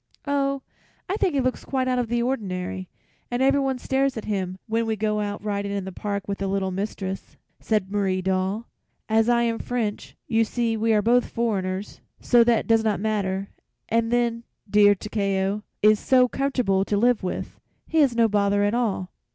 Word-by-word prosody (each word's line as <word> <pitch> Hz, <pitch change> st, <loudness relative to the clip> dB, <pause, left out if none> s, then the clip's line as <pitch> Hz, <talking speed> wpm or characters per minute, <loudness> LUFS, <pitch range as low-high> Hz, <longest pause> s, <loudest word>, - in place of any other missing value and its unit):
"Oh, 275 Hz, -1 st, 0 dB, 0.4 s
I 380 Hz, -, -1 dB
think 380 Hz, -7 st, +1 dB
he 275 Hz, -, +3 dB
looks 255 Hz, 0 st, -1 dB
quite 260 Hz, -1 st, -1 dB
out 250 Hz, -1 st, +1 dB
of 245 Hz, -, -1 dB
the 235 Hz, +1 st, 0 dB
ordinary, 185 Hz, -7 st, -3 dB, 0.4 s
and 245 Hz, +2 st, 0 dB
everyone 270 Hz, -1 st, +2 dB
stares 265 Hz, +1 st, 0 dB
at 220 Hz, -, -5 dB
him 190 Hz, -3 st, -2 dB
when 230 Hz, 0 st, 0 dB
we 220 Hz, -, 0 dB
go 210 Hz, 0 st, 0 dB
out 205 Hz, -1 st, -3 dB
riding 200 Hz, -1 st, -2 dB
in 200 Hz, -1 st, -3 dB
the 190 Hz, -, -5 dB
park 200 Hz, +1 st, -4 dB
with 200 Hz, -1 st, -3 dB
the 195 Hz, -, -1 dB
little 190 Hz, -1 st, -1 dB
mistress," 195 Hz, 0 st, -5 dB, 0.2 s
said 210 Hz, -4 st, -1 dB
Marie 195 Hz, -2 st, 0 dB
Doll. 190 Hz, +4 st, -1 dB, 0.4 s
"As 220 Hz, +1 st, +3 dB
I 235 Hz, 0 st, +3 dB
am 230 Hz, -1 st, 0 dB
French, 230 Hz, -4 st, -3 dB
you 225 Hz, -1 st, +2 dB
see 230 Hz, 0 st, -1 dB
we 220 Hz, -1 st, +2 dB
both 240 Hz, +3 st, +3 dB
are -, -, -9 dB
foreigners, 195 Hz, -4 st, -2 dB, 0.2 s
so 240 Hz, -1 st, +5 dB
that 235 Hz, -1 st, +2 dB
does 225 Hz, -1 st, +3 dB
not 215 Hz, -2 st, +1 dB
matter; 200 Hz, -2 st, -1 dB, 0.4 s
and 230 Hz, 0 st, +1 dB
then, 235 Hz, -1 st, +1 dB, 0.2 s
dear, 205 Hz, 0 st, +5 dB
Takeo 200 Hz, -1 st, -1 dB, 0.2 s
is 215 Hz, 0 st, +6 dB
so 255 Hz, -1 st, +4 dB
comfortable 250 Hz, -8 st, 0 dB
to 205 Hz, +1 st, -1 dB
live 240 Hz, +2 st, +3 dB
with. 185 Hz, -, -5 dB, 0.3 s
He 320 Hz, -, 0 dB
is 275 Hz, -5 st, +4 dB
no 230 Hz, -1 st, +4 dB
bother 205 Hz, -1 st, +2 dB
at 205 Hz, +1 st, +1 dB
all." 210 Hz, -6 st, -1 dB
215 Hz, 190 wpm, -24 LUFS, 200-240 Hz, 0.4 s, is